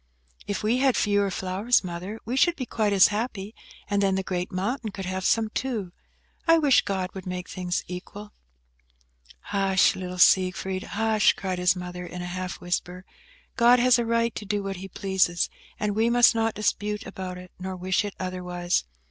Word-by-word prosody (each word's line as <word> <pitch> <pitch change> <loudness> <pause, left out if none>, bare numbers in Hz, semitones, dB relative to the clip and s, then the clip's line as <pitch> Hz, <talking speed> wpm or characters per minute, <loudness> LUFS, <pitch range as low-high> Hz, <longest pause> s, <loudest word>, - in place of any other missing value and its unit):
"If 205 - -3
we 225 +4 +2
had 265 -2 +3
fewer 205 -1 +2
flowers, 190 +6 +1
Mother, 180 +5 -6
we 240 +3 -2
should 340 +6 +3
be 260 - -4
quite 215 -3 0
as 195 -2 +6
happy, 210 -1 -3 0.3
and 205 -1 +1
then 195 -1 +2
the 190 - -1
great 180 -1 -3
mountain 215 +6 -2
could 195 -1 -6
have 185 +1 -3
some 220 +3 +2
too. 220 -9 -3 0.6
I 330 0 +7
wish 285 -6 +5
God 190 -2 -3
would 190 -1 -8
make 180 0 -4
things 180 -1 -3
equal." 205 +4 -8 1.2
"Hush, 195 -1 +3
little 180 -1 -6
Siegfried, 185 +1 +3
hush!" 220 +1 +2
cried 185 -2 -4
his 180 +1 +3
mother, 180 0 -6
in 180 0 -7
a 180 0 -5
half 185 0 -4
whisper; 180 +1 -3 0.5
"God 240 +1 +6
has 250 0 +4
a - - +1
right 230 0 +1
to - - -6
do 205 0 -2
what 195 -1 -4
He 190 +2 -7
pleases, 190 -2 0 0.3
and 210 -1 -1
we 225 +2 +2
must 240 0 +6
not 225 -1 0
dispute 210 0 -1
about 185 -1 -6
it, 180 0 -11
nor 190 0 -5
wish 185 +1 0
it 205 -1 -5
otherwise. 180 - -2
195 Hz, 185 wpm, -26 LUFS, 185-220 Hz, 1.2 s, I